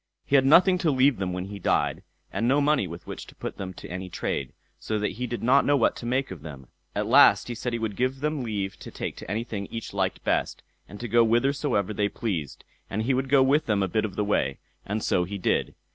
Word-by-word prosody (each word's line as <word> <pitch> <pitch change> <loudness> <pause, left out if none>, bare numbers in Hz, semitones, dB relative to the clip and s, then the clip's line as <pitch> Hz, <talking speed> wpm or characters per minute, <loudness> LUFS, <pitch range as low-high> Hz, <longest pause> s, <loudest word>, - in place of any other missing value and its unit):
He 140 - +1
had 135 -1 +5
nothing 180 +5 +6
to 170 - +1
leave 135 -1 +3
them 95 -1 -2
when 90 0 -3
he 100 +1 -8
died, - - +1 0.3
and 115 - 0
no 135 +3 +4
money 145 0 +2
with 85 +1 -9
which - - -8
to - - -15
put - - -6
them 95 -1 -5
to - - -9
any 90 +1 -6
trade, 70 -6 -3 0.3
so 110 - -2
that 105 0 0
he 125 +2 -4
did 120 -1 -5
not 130 +4 +5
know 145 0 +3
what 115 - +2
to 120 - -6
make 130 0 0
of 90 -6 -8
them. 70 -5 -10 0.3
At - - 0
last - - +6
he - - -2
said 120 +1 -3
he 120 - -1
would 110 -3 -3
give 130 +3 -1
them 150 0 -1
leave 100 -5 -3
to - - -10
take - - -5
to - - -9
anything 105 -1 -3
each 115 -3 -7
liked 95 -2 -1
best, - - -1 0.3
and 100 - -10
to 120 - -3
go 120 0 +5
whithersoever 120 -2 +1
they 100 0 0
pleased, 90 - -4 0.3
and 110 +3 -2
he 130 +4 +1
would 130 +1 -1
go 140 -1 +6
with 145 +3 +2
them 105 -3 +2
a - - +1
bit 110 +4 0
of 105 -3 -4
the 105 - 0
way; 70 -9 0 0.3
and 105 +2 -2
so 90 - +2
he 100 +3 -5
did. 90 - 0
115 Hz, 255 wpm, -26 LUFS, 100-130 Hz, 0.3 s, nothing